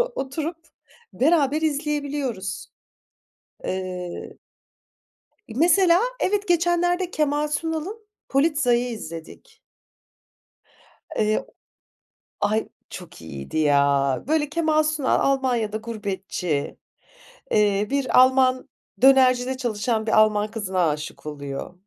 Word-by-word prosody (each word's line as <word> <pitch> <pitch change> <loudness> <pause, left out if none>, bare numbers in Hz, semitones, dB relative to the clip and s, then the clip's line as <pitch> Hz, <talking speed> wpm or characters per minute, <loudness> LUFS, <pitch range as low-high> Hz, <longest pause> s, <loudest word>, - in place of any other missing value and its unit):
oturup 305 +5 -4 0.6
beraber 300 0 +2
izleyebiliyoruz. 285 - -2 1.0
Eee, 185 -1 -5 1.2
mesela 345 +4 +4 0.2
evet, 410 +1 0
geçenlerde 350 +1 +1
Kemal 300 0 0
Sunal'ın 325 +8 -4 0.2
Polizei'i 275 -4 +2
izledik. 165 -6 -10 1.6
Eee 215 0 +1 1.0
Ay, 215 +2 0 0.2
çok 180 - -10
iyiydi 70 - -7
ya. 140 -3 +2
Böyle, 300 -1 +1
Kemal 310 -1 +2
Sunal 305 -3 +1
Almanya'da 250 -6 0
gurbetçi, 195 -8 -4 0.7
eee, 205 -1 +2
bir 275 -2 +3
Alman 255 0 +3 0.3
dönercide 260 -1 +5
çalışan 225 -2 -1
bir - - +1
Alman 210 -1 +3
kızına 190 -6 0
aşık 150 +1 -6
oluyor. 140 0 -6
255 Hz, 85 wpm, -23 LUFS, 195-300 Hz, 1.6 s, dönercide